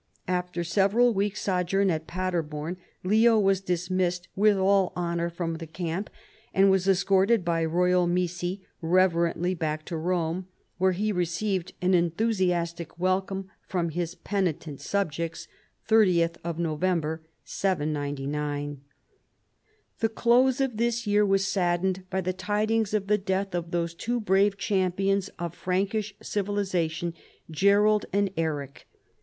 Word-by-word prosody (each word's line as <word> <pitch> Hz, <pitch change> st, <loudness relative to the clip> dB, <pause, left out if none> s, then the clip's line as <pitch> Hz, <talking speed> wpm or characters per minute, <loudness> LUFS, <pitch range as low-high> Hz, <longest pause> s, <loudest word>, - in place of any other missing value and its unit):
After 180 Hz, -1 st, -1 dB
several 200 Hz, +7 st, +3 dB
weeks' 205 Hz, +1 st, -1 dB
sojourn 190 Hz, +1 st, +1 dB
at 160 Hz, -1 st, -3 dB
Paderborn, 170 Hz, -2 st, -3 dB, 0.3 s
Leo 220 Hz, +4 st, +4 dB
was 195 Hz, -2 st, +3 dB
dismissed 180 Hz, -1 st, -1 dB
with 205 Hz, 0 st, +4 dB
all 195 Hz, 0 st, +3 dB
honor 170 Hz, -1 st, -1 dB
from 170 Hz, -1 st, -3 dB
the 165 Hz, 0 st, -8 dB
camp 170 Hz, +4 st, -4 dB, 0.5 s
and 195 Hz, 0 st, +5 dB
was 190 Hz, 0 st, +2 dB
escorted 195 Hz, +2 st, +3 dB
by 165 Hz, -1 st, +1 dB
royal 180 Hz, +2 st, +2 dB
missi 180 Hz, +2 st, -2 dB, 0.2 s
reverently 175 Hz, 0 st, +2 dB
back 155 Hz, -2 st, -3 dB
to 170 Hz, -, -5 dB
Rome, 175 Hz, +1 st, -1 dB, 0.3 s
where 190 Hz, 0 st, +3 dB
he 210 Hz, +4 st, 0 dB
received 180 Hz, +1 st, -1 dB
an 185 Hz, +1 st, +3 dB
enthusiastic 175 Hz, -2 st, 0 dB
welcome 190 Hz, +1 st, -1 dB, 0.2 s
from 175 Hz, -3 st, -1 dB
his 170 Hz, +1 st, -3 dB
penitent 170 Hz, -9 st, -2 dB
subjects 170 Hz, -4 st, -2 dB, 0.4 s
(30th 180 Hz, -7 st, +4 dB, 0.2 s
November, 165 Hz, -1 st, -1 dB, 0.2 s
799). 145 Hz, -4 st, -2 dB, 1.2 s
The 225 Hz, -, +1 dB
close 245 Hz, +4 st, +3 dB
of 265 Hz, -5 st, 0 dB
this 235 Hz, 0 st, 0 dB
year 205 Hz, 0 st, +3 dB
was 195 Hz, -1 st, +2 dB
saddened 185 Hz, 0 st, 0 dB
by 190 Hz, 0 st, -1 dB
the 185 Hz, 0 st, -2 dB
tidings 215 Hz, +2 st, 0 dB
of 205 Hz, -2 st, 0 dB
the 210 Hz, +1 st, +2 dB
death 195 Hz, 0 st, -2 dB
of 170 Hz, -1 st, -3 dB
those 170 Hz, -1 st, -1 dB
two 240 Hz, +8 st, -2 dB
brave 200 Hz, -1 st, +2 dB
champions 195 Hz, -2 st, 0 dB
of 170 Hz, -1 st, -4 dB
Prankish 200 Hz, +3 st, -1 dB
civilization, 185 Hz, -5 st, -1 dB, 0.4 s
Gerold 205 Hz, +5 st, +3 dB
and 200 Hz, 0 st, +1 dB
Eric. 145 Hz, -4 st, -3 dB
185 Hz, 125 wpm, -27 LUFS, 170-200 Hz, 1.2 s, and